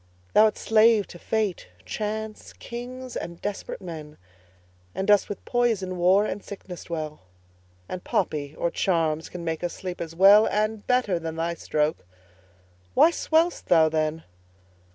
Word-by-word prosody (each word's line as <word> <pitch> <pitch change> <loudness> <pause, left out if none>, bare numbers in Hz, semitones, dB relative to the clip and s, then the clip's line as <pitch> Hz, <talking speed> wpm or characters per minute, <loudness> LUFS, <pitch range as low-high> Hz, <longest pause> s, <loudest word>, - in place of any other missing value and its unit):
Thou'rt 215 0 +5
slave 220 -1 +4
to 175 - -11
fate, 215 - -1 0.2
chance, 215 - -5
kings, 250 +1 -8
and 170 0 -5
desperate 205 -1 -5
men, 155 -4 -8 0.8
And 195 - -2
dost 205 -1 +4
with 205 - -7
poison, 225 -7 0
war, 185 +4 +4
and 205 -1 -4
sickness 190 -3 -9
dwell; 155 -2 -5 0.7
And 185 - -6
poppy 145 -1 -1
or 170 - 0
charms 165 -4 0
can 175 -1 -7
make 160 0 -3
us 175 - -2
sleep 185 -1 -6
as 165 -1 -6
well 200 +4 +7
And 215 0 -1
better 250 -8 +2
than 160 -1 -5
thy 165 +1 -1
stroke. 155 -2 -1 0.9
Why 335 - +6
swell'st 330 +1 +1
thou 160 -2 +5
then? 155 0 -1
185 Hz, 145 wpm, -25 LUFS, 165-215 Hz, 0.9 s, well